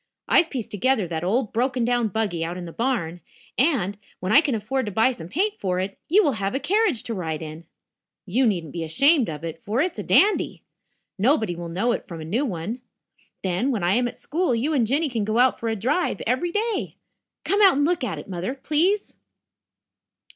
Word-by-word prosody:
I've 335 - +4
pieced 250 -6 -5
together 215 -1 +1
that 165 -1 -3
old 220 +5 0
broken 250 +1 +1
down 240 -1 +1
buggy 200 -5 -1
out 170 +2 -4
in 180 - -6
the 165 - -8
barn, 175 -8 -2 0.3
and, 225 - +1 0.2
when 185 +2 -2
I 280 - +8
can 285 -6 -1
afford 225 +3 -2
to - - -3
buy 225 +6 +3
some 165 -10 -8
paint 400 - -1
for 185 -2 -1
it, 195 +1 -3
you 405 +6 +5
will 290 - +3
have 195 +5 -1
a - - +1
carriage 360 - +1
to 230 - -4
ride 160 -5 -3
in. 155 +2 -8 0.6
You 240 +7 +2
needn't 170 -8 -1
be 170 - -3
ashamed 275 - +3
of 155 0 -6
it, 165 +4 -6
for 220 +3 -1
it's 350 +4 0
a - - -3
dandy. 415 +2 +3 0.6
Nobody 220 - +2
will 170 0 -6
know 195 +9 0
it - - -3
from 170 -3 -7
a 155 - -7
new 230 - 0
one. 205 +5 -4 0.6
Then, 190 +8 0
when 225 -9 -1
I 175 +2 +3
am 245 +2 +2
at - - -8
school, 320 -4 0
you 275 +8 0
and 245 -6 +2
Jinny 295 +6 +1
can 235 -6 -2
go 215 +2 -1
out 255 +1 +4
for 230 - -2
a 225 - 0
drive 260 - 0
every 255 +9 0
day. 430 +1 -2 0.5
Come 405 +2 +2
out 390 -6 +7
and 290 - +3
look 340 -3 0
at 240 - -2
it, - - -8
Mother, 185 +6 -4
please." 330 +9 0
230 Hz, 220 wpm, -24 LUFS, 185-280 Hz, 0.6 s, I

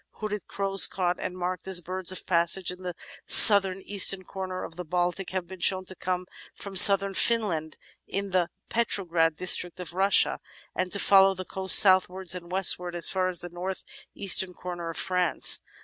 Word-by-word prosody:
Hooded 210 -2 -8
Crows 195 -1 +2
caught 180 -2 -4
and 180 - -7
marked 180 0 -6
as 190 -2 +2
birds 185 +1 -3
of 185 - -7
passage 170 +1 0
at 180 - -12
the 180 -2 -8 0.3
south 200 -3 +8 0.2
eastern 195 -1 +3
comer 185 0 -8
of 165 - -11
the 180 - -8
Baltic 175 +2 -4
have 185 -1 -5
been 185 +2 -13
shown 185 +1 +1
to 185 - -8
come 180 0 -5 0.3
from 200 -1 -11
Southern 195 +1 +5
Finland 185 -9 -1 0.3
and 200 0 -5
the 180 -2 -1 0.2
Petrograd 175 -8 -2
district 180 0 -3
of 180 -1 -5
Russia, 195 +2 +1 0.3
and 185 0 -5
to - - +3
follow 195 -1 +3
the 185 0 -9
coasts 190 +1 +5
southwards 185 -1 +3
and 175 -1 -9
west 190 -1 +4
wards 175 -1 -8
as 170 - +1
far 185 -1 -2
as 180 -2 -5
the 175 - -9
north 180 +2 -8 0.3
eastern 190 -2 +2
comer 175 -2 -8
of 165 - -9
France. 180 -3 0
185 Hz, 185 wpm, -24 LUFS, 175-195 Hz, 0.3 s, south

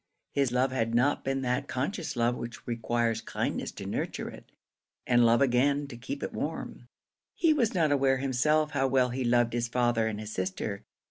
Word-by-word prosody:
His 140 -3 +1
love 130 +1 +2
had 115 -3 -1
not 135 +5 +2
been 135 0 -1
that 125 +3 -1
conscious 150 +5 -3
love 120 +1 +2
which 120 -1 -7
requires 115 -1 0
kindness - - -3
to - - -8
nurture - - -3
it, - - -14 0.5
and 120 -1 +4
love 120 +4 +4
again 140 +3 +2
to 125 - -8
keep 130 +4 -6
it - - -4
warm. 150 -5 -5 0.5
He 330 -2 +4
was 235 -9 +1
not 160 -4 +3
aware 135 -1 +3
himself 150 +4 +1
how 135 - +1
well 130 -1 +3
he 130 +2 -2
loved 120 -1 +2
his 120 0 0
father 120 -2 +1
and 105 -1 -3
his 110 0 -6
sister. 95 +2 -3
125 Hz, 190 wpm, -29 LUFS, 120-140 Hz, 0.5 s, and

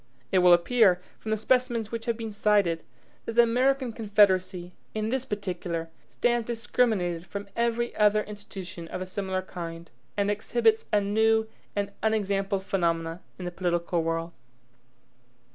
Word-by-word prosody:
It 190 - +4
will 180 0 +6
appear, 180 +1 +5 0.2
from 220 - -7
the 220 - +1
specimens 235 -1 +1
which 230 -1 -4
have 235 -2 0
been 225 -2 -5
cited, 205 -5 +2 0.4
that 230 - -4
the 235 +1 +7
American 255 +1 +1
Confederacy, 190 -5 +2 0.2
in 215 0 -1
this 260 +1 -1
particular, 175 -6 -4 0.2
stands 240 -2 0
discriminated 215 -7 0
from 200 0 -6
every 235 0 0
other 210 0 +4
institution 195 -5 -8
of 180 - -5
a - - -6
similar 185 0 -3
kind, 170 -2 -7 0.3
and 200 0 +2
exhibits 225 +1 +2
a 210 - +4
new 220 +2 +2 0.3
and 200 0 -1
unexampled 200 -3 0
phenomenon 165 -3 0 0.2
in 180 - -6
the 175 - -3
political 175 -1 0
world. 165 +1 -2
205 Hz, 145 wpm, -27 LUFS, 180-225 Hz, 0.4 s, the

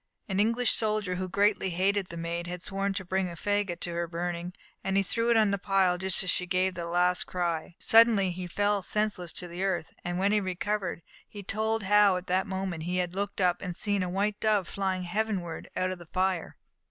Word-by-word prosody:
An 190 -1 -1
English 230 +3 +2
soldier, 215 -4 +1
who 185 +1 -3
greatly 200 0 +2
hated 190 +2 +1
the 170 - -8
Maid, 170 +1 -3
had 180 0 -6
sworn 195 +1 -1
to 190 -2 -3
bring 185 +1 0
a 170 - -7
faggot 205 0 -1
to 175 - -3
her 170 0 -1
burning, 175 +1 -3 0.3
and 195 0 0
he 195 - +4
threw 230 +4 0
it 235 - +5
on 215 -2 +4
the 200 - 0
pile 190 -2 +2
just 190 0 0
as 185 - -2
she 180 - -1
gave 185 +1 +1
that 170 -1 -5
last 180 +1 +1
cry. 170 -2 -2
Suddenly 225 -4 +6
he 180 0 -5
fell 205 +3 +1
senseless 205 -3 -1
to 180 - -5
the 175 +2 -5
earth, 190 -4 -1
and 175 0 -2
when 195 +2 +2
he 210 0 +3
recovered, 190 -1 -2 0.2
he 205 -1 -9
told 220 +2 0
how 205 -1 +5
at 180 - -6
that 185 +1 0
moment 190 -3 -3
he 180 +3 -2
had 180 -1 -1
looked 200 +1 -3
up, 180 -2 +3
and 180 -3 -4
had - - -16
seen 205 -2 +1
a 180 - -1
white 200 +3 -1
dove 210 -4 +2
fly 190 -1 -1
heavenward 180 -2 -3
out 185 0 +1
of 185 - -6
the 175 - -12
fire. 185 -1 -1
190 Hz, 225 wpm, -29 LUFS, 180-205 Hz, 0.3 s, Suddenly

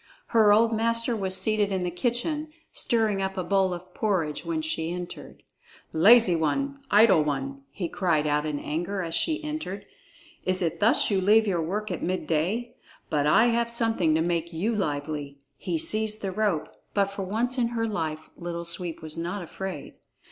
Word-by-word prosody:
Her 220 -3 +5
old 225 +2 +4
master 230 +1 0
was 190 -3 0
seated 215 -2 +1
in 190 -1 -1
the 175 - -2
kitchen, 260 - -2 0.2
stirring 220 -4 +1
up 190 0 -3
a 185 - -1
bowl 190 0 +2
of 180 +1 -7
porridge, 180 -8 -1
when 320 -1 -2
she 170 - -2
entered. 180 0 -8 0.5
"Lazy 200 +3 +6
one! 275 - -1
Idle 205 -6 +6
one!" 135 -2 -3
he 170 +5 -4
cried 165 -4 0
out 150 0 +1
in 150 -1 -2
anger 175 +7 -3
as 165 -1 -5
she 320 - 0
entered. 255 -11 -5 0.6
"Is 185 0 0
it 165 - -2
thus 225 +3 +3
you 195 -2 +2
leave 215 +3 +5
your 180 -5 0
work 200 +6 -3
at 175 - -4
midday? 185 +7 -1 0.4
But 150 -1 +1
I 225 +10 +5
have 235 0 +1
something 225 -9 +2
to 160 - +2
make 170 0 -1
you 200 +8 -1
lively." 145 -5 -3 0.2
He 330 - -3
seized 220 -9 +3
the 195 - -2
rope. 200 -5 0 0.3
But 200 -1 +2
for 200 - -6
once 230 +7 -1
in 235 - +2
her 230 -1 -2
life 160 -7 -4
Little 170 0 -5
Sweep 170 -1 -2
was 155 +1 -4
not 175 +3 -3
afraid. 185 -2 -7
190 Hz, 180 wpm, -26 LUFS, 165-225 Hz, 0.6 s, Lazy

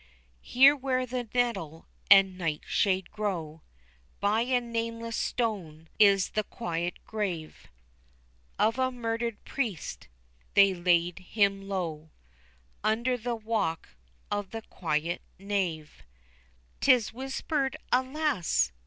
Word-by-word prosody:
Here 270 +3 +6
where 255 -2 -1
the 245 -2 -4
nettle 230 -11 -1 0.2
and 195 -2 +7
nightshade 180 +3 0
grow 175 -7 -3 0.6
By 210 +3 +2
a 250 +1 +2
nameless 230 -1 -4
stone, 175 -10 -2
is 200 -3 +5
the 215 - 0
quiet 175 -5 -3
grave 185 -8 -4 0.9
Of 225 +4 +2
a 260 0 +2
murdered 230 -2 -3
priest; 225 - -4 0.5
they 200 -1 +7
laid 175 0 +2
him 195 +1 0
low 160 -5 -3 0.7
Under 235 +4 +1
the 240 0 -3
walk 215 -7 -2 0.4
of 205 -2 -2
the 225 -1 -6
quiet 165 -1 -2 0.2
nave. 185 -6 -3 0.8
'Tis 250 -6 +4
whispered 270 +2 -2
alas! 260 - +1
210 Hz, 105 wpm, -29 LUFS, 175-240 Hz, 0.9 s, and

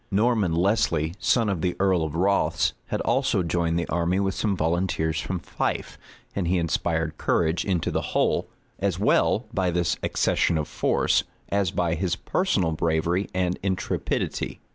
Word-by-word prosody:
Norman 105 -3 +2
Lesly, 85 -4 +1
son 115 -3 +2
of 95 -5 -1
the 90 0 0
earl 95 -3 +3
of 80 -1 -4
Rothes, 100 +4 +2
had - - -2
also 90 - +1
joined 85 0 0
the 85 - -1
army 85 +2 +1
with 95 -1 0
some 100 -2 -1
volunteers 80 -1 0
from 95 - -3
Fife; 85 - -3 0.4
and 95 -4 -1
he 90 +2 +2
inspired 80 -1 -1
courage 80 0 +1
into 90 -5 0
the - - 0 0.2
whole, - - +2 0.3
as - - 0
well - - +2
by 95 -1 +1
this 85 0 0
accession 85 - +1
of 75 - -2
force, - - +1 0.3
as 100 -2 +1
by 85 -1 0
his 90 +1 -1
personal 100 - 0
bravery 85 +4 0
and 90 -1 0
intrepidity. 95 -1 -2
90 Hz, 160 wpm, -25 LUFS, 85-95 Hz, 0.4 s, earl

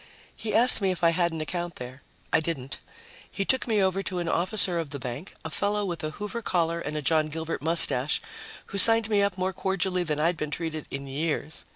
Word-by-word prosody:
He 220 - -4
asked 235 0 +6
me 195 - +1
if 185 -2 -4
I 165 - +5
had 170 0 0
an 160 -1 -5
account 175 +2 -5
there. 125 +2 -10 0.3
I - - +5
didn't. 145 -5 -5 0.5
He 195 - -4
took 260 +3 0
me 215 -4 +1
over 190 +1 0
to 185 -2 -5
an 175 -1 -3
officer 180 0 +3
of 160 -3 -5
the 140 - -6
bank, 125 +6 -7
a 160 - -5
fellow 205 +5 -1
with 175 -4 -5
a 155 - -2
Hoover 210 +8 -6
collar 170 -5 -1
and 155 -2 -5
a 150 - -5
John 155 0 +1
Gilbert 160 -1 -5
mustache, 150 -4 +5 0.5
who 200 - -3
signed 225 +1 +7
me 205 -1 +3
up 200 -2 -1
more 185 +1 -2
cordially 190 -1 -1
than 155 -4 -3
I'd 165 +3 0
been 150 -1 -4
treated 155 -1 -5
in 135 0 -6
years. 150 +2 -4
170 Hz, 225 wpm, -26 LUFS, 155-195 Hz, 0.5 s, signed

